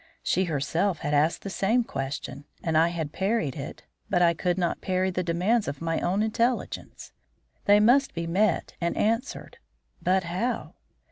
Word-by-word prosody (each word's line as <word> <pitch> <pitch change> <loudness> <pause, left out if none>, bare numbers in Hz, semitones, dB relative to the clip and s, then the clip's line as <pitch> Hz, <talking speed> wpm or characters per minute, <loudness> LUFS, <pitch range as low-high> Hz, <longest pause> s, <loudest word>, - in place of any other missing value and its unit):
She 190 - +1
herself 165 +3 0
had 150 -2 -2
asked 150 +3 +2
this 195 - -5
same 230 +5 +2
question, 140 -3 -5 0.2
and 160 -1 0
I 160 +2 +5
had 165 -3 -3
parried 190 - 0
it. 140 - -7 0.3
But 180 -2 +3
I 170 -1 +5
could 175 +2 -1
not 175 -2 -1
parry 185 0 0
the 185 - -1
demands 180 +7 +1
of 140 -1 -4
my 165 0 -1
own 190 +4 +1
intelligence. 230 +3 -2 0.5
They 205 0 +6
must 255 +6 +4
be 170 0 -2
met 185 +2 +1
and 170 0 -1
answered. 230 +5 -1 0.4
But 185 +1 +2
how? 185 +9 -2
180 Hz, 165 wpm, -26 LUFS, 165-205 Hz, 0.5 s, They